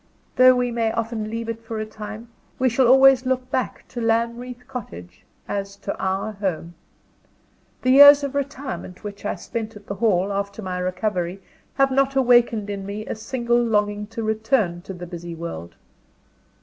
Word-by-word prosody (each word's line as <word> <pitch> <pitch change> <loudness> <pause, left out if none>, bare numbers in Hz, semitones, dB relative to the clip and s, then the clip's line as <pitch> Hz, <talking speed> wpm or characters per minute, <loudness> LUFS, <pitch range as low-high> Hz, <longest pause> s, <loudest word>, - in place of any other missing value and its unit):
Though 255 0 +7
we 245 -1 0
may 230 -1 0
often 225 -1 -3
leave 230 +1 -4
it 230 0 -5
for 225 -1 -5
a 215 - -2
time, 215 +1 -9 0.3
we 260 0 +2
shall 245 +1 +3
always 265 0 +6
look 255 0 -1
back 255 - -2
to 240 - -6
Lanreath 235 +2 -1
Cottage 145 - -9 0.2
as 200 0 -4
to 200 0 -5
our 190 +3 -1
home. 185 -5 -4 1.1
The 255 - +3
years 285 +1 +9
of 280 -1 -3
retirement 280 -9 -5
which 205 -1 -8
I - - -1
spent 225 -1 -6
at 205 -1 -13
the 200 - -4
Hall, 200 -2 +1
after 200 +2 -4
my 180 -1 -3
recovery, 185 0 -2 0.4
have 275 -1 +3
not 275 0 +2
awakened 240 -5 +3
in 200 -1 -5
me 205 +2 -6
a - - -3
single 240 +2 0
longing 210 -2 0
to 225 +1 -6
return 220 -5 0
to - - -3
the 175 0 -8
busy 170 -1 -7
world. 85 - -7
220 Hz, 175 wpm, -23 LUFS, 200-250 Hz, 1.1 s, years